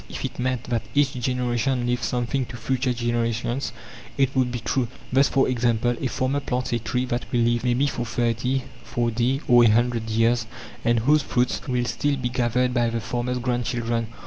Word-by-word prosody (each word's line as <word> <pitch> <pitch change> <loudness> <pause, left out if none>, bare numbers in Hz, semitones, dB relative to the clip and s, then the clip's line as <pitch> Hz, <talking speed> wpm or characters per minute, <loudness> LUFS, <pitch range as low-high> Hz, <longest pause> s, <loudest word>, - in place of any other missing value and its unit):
If - - -5
it - - -6
meant 125 -1 -1
that 115 -2 -1
each 140 -2 +3
generation 125 0 0
leaves 120 0 0
something 125 +1 -1
to 120 - -8
future 130 +2 0
generations, 120 +2 -1 0.5
it 135 -1 +2
would 130 -2 +2
be 125 - -2
true; 120 +2 -1 0.3
thus, 135 +1 +5
for 135 - +3
example, 120 -1 +1
a 135 - +1
farmer 130 +3 0
plants 125 -3 -2
a 120 - +1
tree 125 +3 -1
that 120 -1 -3
will 120 -2 +2
live, 120 0 +2
maybe, 125 +2 +2
for 125 -3 -2
thirty, 120 +3 0 0.2
forty, 120 +3 0
or 120 -1 +7
a 115 - +6
hundred 115 0 +1
years, 115 +1 +2 0.4
and 120 -1 +2
whose 150 +6 +4
fruits 125 -2 0
will 125 -2 0
still 145 +3 0
be 125 -2 -2
gathered 125 +1 +1
by 120 -1 +2
the 115 0 -2
farmer's 125 +1 -2
grandchildren. 120 -2 -1
120 Hz, 190 wpm, -24 LUFS, 120-130 Hz, 0.5 s, or